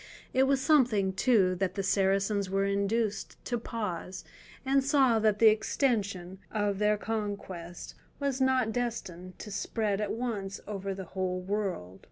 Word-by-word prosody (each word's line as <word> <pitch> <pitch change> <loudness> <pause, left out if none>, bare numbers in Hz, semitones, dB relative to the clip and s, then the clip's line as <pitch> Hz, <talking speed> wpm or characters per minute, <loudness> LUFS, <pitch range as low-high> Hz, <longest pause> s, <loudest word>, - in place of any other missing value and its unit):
It 265 +1 +4
was 275 -1 +3
something, 245 -9 +3
too, 190 -3 +3
that 185 -1 -1
the 195 - -1
Saracens 195 +1 +1
were 195 +1 +1
induced 200 +1 -1
to 240 -2 -1
pause, 190 -5 -5 0.4
and 270 0 +3
saw 265 -5 +4
that 215 -1 +3
the 225 0 +7
extension 200 -5 0
of 205 -2 -1
their 210 0 +3
conquests 200 -6 -5 0.3
was 280 -2 -1
not 260 -3 +3
destined 190 -7 -4
to 210 - -8
spread 205 0 -1
at 210 - -1
once 215 -5 -3
over 195 -1 -4
the 190 -1 -6
whole 185 -1 -1
world. 185 - -3
205 Hz, 150 wpm, -30 LUFS, 190-230 Hz, 0.4 s, the